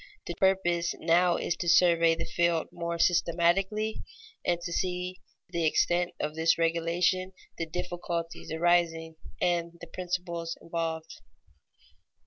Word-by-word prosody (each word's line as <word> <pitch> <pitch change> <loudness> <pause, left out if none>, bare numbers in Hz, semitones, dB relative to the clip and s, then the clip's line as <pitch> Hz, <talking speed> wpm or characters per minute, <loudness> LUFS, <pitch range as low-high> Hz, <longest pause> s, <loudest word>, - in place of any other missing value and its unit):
The 175 - -4
purpose 175 -2 +1
now 175 +1 +3
is 175 - -1
to 175 - -1
survey 170 -1 +5
the 165 - -4
field 170 -2 +1
more 170 0 -3
systematically 180 +5 +2 0.4
and 175 -1 +1
to 170 0 -4
see 180 0 -2 0.3
the 170 -1 -1
extent 175 +3 +1
of 150 - -2
this 160 +1 +2
regulation, 170 +3 +1 0.3
the 165 - -2
difficulties 175 -1 -4
arising, 165 -1 +1 0.2
and 170 -1 0
the - - -8
principles 175 -2 -4
involved. 165 - -4
170 Hz, 120 wpm, -29 LUFS, 165-180 Hz, 0.4 s, survey